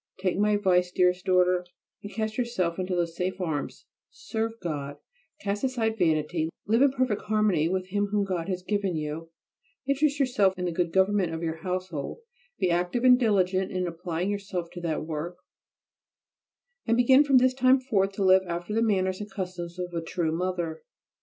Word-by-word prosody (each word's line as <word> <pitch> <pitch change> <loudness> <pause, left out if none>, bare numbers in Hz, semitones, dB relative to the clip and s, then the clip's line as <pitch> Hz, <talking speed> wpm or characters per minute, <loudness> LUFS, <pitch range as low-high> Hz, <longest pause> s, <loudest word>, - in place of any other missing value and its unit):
Take 185 0 0
my 210 0 +3
advice, 180 -3 +2
dearest 180 0 +2
daughter, 180 -1 +3 0.4
and 205 - -8
cast 220 -1 -3
yourself 190 -9 -1
into 185 0 -1
these 170 -1 -1
safe 185 +2 -2
arms: 160 -6 -3 0.2
serve 225 0 -3
God, 145 -4 -4 0.4
cast 205 +3 -2
aside 225 -4 0
vanity, 160 -1 +1 0.2
live 225 +4 +2
in 280 - +6
perfect 255 -5 0
harmony 210 -7 +2
with 185 0 -2
him 205 +1 0
whom 205 0 0
God 185 -2 -3
has 180 -1 -3
given 200 -2 -1
you, 155 +2 -4 0.6
interest 280 +1 +1
yourself 205 -8 +2
in 180 - -2
the 175 - -1
good 170 0 -1
government 190 -2 +2
of 160 - -5
your 160 -1 -2
household, 180 - -4 0.4
be 180 - +1
active 175 +8 0
and 250 -1 +7
diligent 190 -5 +1
in 185 -1 -1
applying 175 +2 -3
yourself 195 -4 -4
to 175 - -8
that 160 -2 -2
work, 165 +3 -5 1.5
and 230 +1 +3
begin 260 +3 +6
from 275 -3 +4
this 255 0 +4
time 260 +1 +4
forth 200 -7 +1
to 195 - -2
live 190 0 +6
after 175 +4 -4
the 225 - +1
manners 190 -3 +1
and 210 - -6
customs 180 -3 -6
of 180 -1 -5
a 170 - -2
true 165 -1 -2
mother. 170 -2 -2
185 Hz, 180 wpm, -27 LUFS, 175-210 Hz, 1.5 s, and